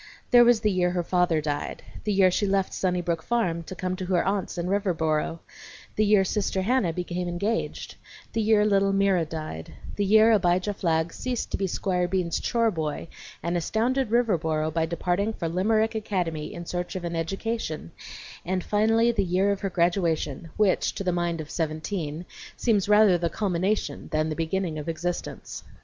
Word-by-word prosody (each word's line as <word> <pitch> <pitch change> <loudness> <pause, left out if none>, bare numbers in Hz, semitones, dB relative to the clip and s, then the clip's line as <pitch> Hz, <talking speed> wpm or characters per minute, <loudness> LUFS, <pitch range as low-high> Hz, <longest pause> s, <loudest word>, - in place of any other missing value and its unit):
There 245 -1 +8
was 240 -2 +4
the 210 -2 +2
year 180 -1 +2
her 175 0 -1
father 175 -2 +2
died; 145 -1 -3 0.2
the 210 - +1
year 190 -2 +4
she 205 +3 0
left 195 -1 0
Sunnybrook 175 -3 -1
Farm 180 -6 0
to 185 - -7
come 185 +1 -2
to 185 - -4
her 180 -2 +1
aunts 195 -1 -1
in 170 - -2
Riverboro; 165 -5 0 0.5
the 215 - +2
year 205 -2 +5
Sister 190 0 -1
Hannah 230 -4 +2
became 180 +1 -3
engaged; 200 +6 -3 0.4
the 225 - +1
year 215 -1 +4
little 195 -1 +3
Mira 195 -4 +2
died; 155 - -6 0.2
the 205 - +1
year 220 +3 +6
Abijah 185 -1 +2
Flagg 165 -3 0
ceased 250 -2 -3
to - - -1
be 195 - -1
Squire 180 -1 0
Bean's 175 -2 -1
chore 230 -2 +1
boy, 160 -2 -4 0.3
and 170 +1 -1
astounded 230 +8 0
Riverboro 160 -10 +1
by 165 0 +1
departing 180 +5 -1
for 170 - -3
Limerick 215 +6 +1
Academy 180 -8 -2
in 170 - -7
search 175 +2 -4
of 185 - -4
an 170 -1 -3
education; 165 - -3 0.5
and 185 +1 -2
finally 225 +3 +3
the 210 -4 0
year 190 +2 +2
of 200 - -2
her 195 - -1
graduation, 170 -4 0
which, 210 -3 +2
to - - -4
the 185 - +1
mind 175 -1 -1
of 155 -2 -7
seventeen, 160 0 -3 0.3
seems 210 -4 +1
rather 210 -4 +6
the 170 0 0
culmination 185 -4 -1
than 155 0 +1
the 155 - -2
beginning 165 0 -2
of 150 - -5
existence. 175 +2 -4
185 Hz, 180 wpm, -26 LUFS, 170-205 Hz, 0.5 s, There